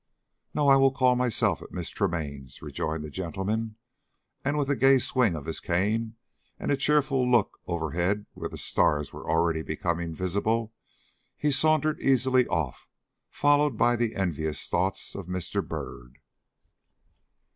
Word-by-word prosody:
"No. 145 - +2
I 135 0 +7
will 135 0 +5
call 130 -1 +3
myself 125 -3 +1
at - - -11
Miss - - -5
Tremaine's," 70 -6 -3
rejoined 80 0 -4
the 75 - -7
gentleman. 100 +6 -3 0.7
And, 145 +2 0
with 145 -2 0
a - - +2
gay 135 +1 +5
swing 125 -6 +1
of 75 -3 -7
his 80 - -3
cane 110 +6 -1 0.4
and - - -2
a - - +4
cheerful 140 -3 +2
look 120 -4 +2
overhead 85 +4 -1
where - - -5
the - - -8
stars 75 -1 +1
were - - -8
already 80 0 +2
becoming 85 +2 -2
visible, 105 +6 -1 0.6
he 150 - +1
sauntered 155 +2 +3
easily 130 -1 +3
off, 80 -8 -3 0.4
followed 145 -3 +2
by 120 +2 +3
the 115 -1 -1
envious 80 -5 -2
thoughts 95 +1 -1
of 95 -3 -7
Mr. 90 -1 -2
Byrd. - - -7
105 Hz, 145 wpm, -27 LUFS, 85-130 Hz, 0.7 s, I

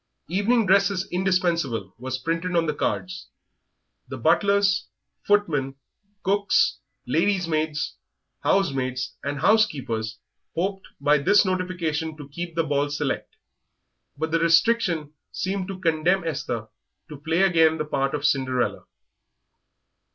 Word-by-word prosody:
"Evening 210 +6 +2
dress 195 +1 +4
is 190 -1 -3
indispensable" 170 - 0
was 130 +1 -3
printed 165 +5 -2
on 165 -1 +3
the 150 - 0
cards. 185 +5 -3 0.8
The - - -6
butlers, 200 -2 +2 0.3
footmen, 155 -10 +1 0.5
cooks, 200 +1 +2 0.3
ladies' 195 -4 +1
maids, 155 -2 -1 0.4
housemaids, 130 -8 0
and 140 0 -3
housekeepers 135 - +1 0.4
hoped 190 +3 -2
by 145 +1 +3
this 205 +9 +4
notification 170 -4 -2
to 145 -2 -9
keep 170 +3 -6
the 165 - +2
ball 145 -1 0
select. 145 - -3 0.8
But 160 +2 -2
the 165 - +2
restriction 165 -2 +2 0.2
seemed 190 0 -2
to 195 -2 -6
condemn 170 +2 +2
Esther 135 -8 -3 0.4
to 150 - -8
play 165 +4 +1
again 165 -4 +4
the 155 - -2
part 135 -2 -1
of 145 0 -3
Cinderella. 130 -4 0
165 Hz, 120 wpm, -24 LUFS, 145-190 Hz, 0.8 s, dress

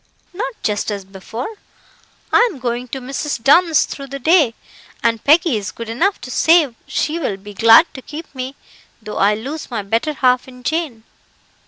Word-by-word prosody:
"Not 445 +6 -4
just 210 0 -1
as 200 -2 -4
before. 225 - -7 0.8
I 475 - +5
am 305 - -10
going 245 0 -3
to 265 - -5
Mrs. 275 +3 -3
Dunn's 325 +3 +5
through 275 -1 -8
the 275 +1 -6
day, 295 -4 +3 0.5
and 230 -1 +1
Peggy 310 - +4
is 200 -2 -4
good 230 -1 -8
enough 345 - 0
to 255 - -8
say 320 -6 +4
she 320 +2 -1
will 210 -11 -2
be 205 +1 -11
glad 230 - +7
to 265 - -8
keep 305 +5 -8
me, 260 0 -5 0.4
though 215 -2 -7
I 205 +2 +4
lose 275 +9 -6
my 230 -5 -3
better 225 +10 -1
half 255 -2 +2
in 250 -1 -13
Jane. 295 -6 -2
255 Hz, 180 wpm, -18 LUFS, 225-315 Hz, 0.8 s, glad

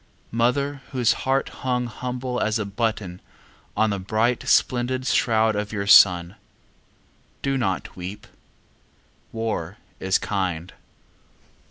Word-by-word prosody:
Mother 135 +5 0
whose 125 -3 +3 0.2
heart 135 +1 +2
hung 125 -2 0
humble 125 +1 -4
as 110 +1 +1
a 110 - -2
button 100 -3 -3 0.6
On 110 0 +3
the 100 - -2
bright 110 +5 0
splendid 130 +1 +2
shroud 110 -3 +2
of 105 0 -3
your 100 -2 -3
son, 90 -3 +6 1.1
Do 135 0 0
not 95 -8 -2
weep. 95 +3 -7 1.1
War 110 -5 -3 0.2
is 95 0 +2
kind. 90 -3 -3
110 Hz, 115 wpm, -24 LUFS, 100-125 Hz, 1.1 s, son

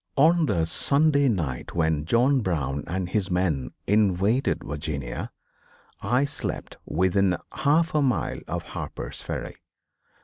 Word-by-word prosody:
On 160 +3 +5
the 80 -1 +1
Sunday 140 - +2
night 75 - -2
when 80 -3 +1
John 125 - +3
Brown 75 - -1
and 90 +1 -2
his 100 +1 -1
men 90 -7 0 0.2
invaded 105 +4 +2
Virginia, 75 -4 -4 0.7
I 125 +3 +2
slept 140 - -5
within 95 +2 +2
a - - -5 0.2
half 160 +3 +3
mile 140 -5 +1
of - - -3
Harper's - - -6
Ferry. - - -5
95 Hz, 125 wpm, -26 LUFS, -, 0.7 s, On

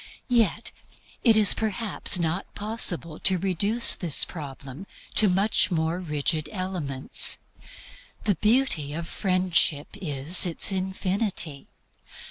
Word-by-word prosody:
Yet 225 -2 0 0.5
it 225 -3 +4
is 210 -2 +5
perhaps 215 -2 +2
not 170 +2 -4
possible 190 -7 0
to 190 -1 +2
reduce 200 +6 +3
this 170 -6 0
problem 140 +1 -10 0.3
to 210 - +5
much 195 +2 +1
more 165 0 -2
rigid 155 -2 -3
elements. 180 - 0 0.9
The 205 - +1
beauty 210 - 0
of 165 +1 -6
Friendship 185 -7 -1
is 160 0 +3
its 175 +4 +1
infinity. 190 -4 -4
185 Hz, 105 wpm, -24 LUFS, 160-205 Hz, 0.9 s, is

